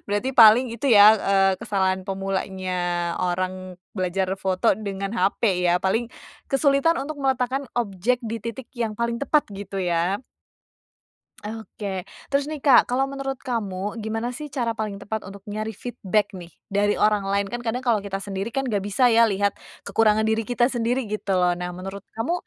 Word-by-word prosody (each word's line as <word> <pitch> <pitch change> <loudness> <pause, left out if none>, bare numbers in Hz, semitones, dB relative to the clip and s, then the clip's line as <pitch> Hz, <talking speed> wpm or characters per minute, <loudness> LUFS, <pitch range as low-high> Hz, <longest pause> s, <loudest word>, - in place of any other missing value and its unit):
Berarti 205 +6 -1
paling 235 0 +7
itu 235 +4 -2
ya, 215 -2 +9
eee, 195 -2 +3
kesalahan 190 -2 0
pemulanya 190 -1 -3 0.5
orang 185 0 -2 0.2
belajar 185 0 -1
foto 185 -1 +2
dengan 195 0 -4
HP 190 -3 +1
ya. 175 - +4
Paling 195 +6 0 0.4
kesulitan 275 +4 +3
untuk 300 0 -6
meletakkan 265 0 0
objek 225 +1 0
di 225 0 -4
titik 230 +3 -7
yang 230 -4 -3
paling 235 +1 -1
tepat, 290 +1 +2
gitu 195 0 -7
ya. 180 +4 0 1.2
Oke, 220 -1 -7 0.5
terus 280 +1 +1
nih, 310 - -4
Kak, 270 -4 +6
kalau 255 +2 +2
menurut 275 -1 -4
kamu, 210 -4 -4
gimana 225 +3 -3
sih, 300 +3 -7
cara 240 -4 -1
paling 215 -2 -4
tepat 210 +2 -4
untuk 200 0 -12
nyari 215 +1 -4
feedback 215 -3 -2
nih 175 -2 -9 0.2
dari 205 +1 +1
orang 210 -1 +3
lain? 200 0 +1
Kan 240 +5 -5
kadang 245 +2 -3
kalau 225 -4 +2
kita 195 -1 -4
sendiri 195 +2 -4
kan, 270 +3 -2
nggak 210 -6 0
bisa 205 +6 +1
ya 230 - +6
lihat 200 0 +1 0.3
kekurangan 220 -1 +3
diri 220 0 +1
kita 245 0 +3
sendiri 245 0 0
gitu 205 -3 -1
loh. 180 -1 +3
Nah, 180 0 -4
menurut 195 +2 -7 0.2
kamu, 230 +10 0
215 Hz, 170 wpm, -24 LUFS, 195-240 Hz, 1.2 s, ya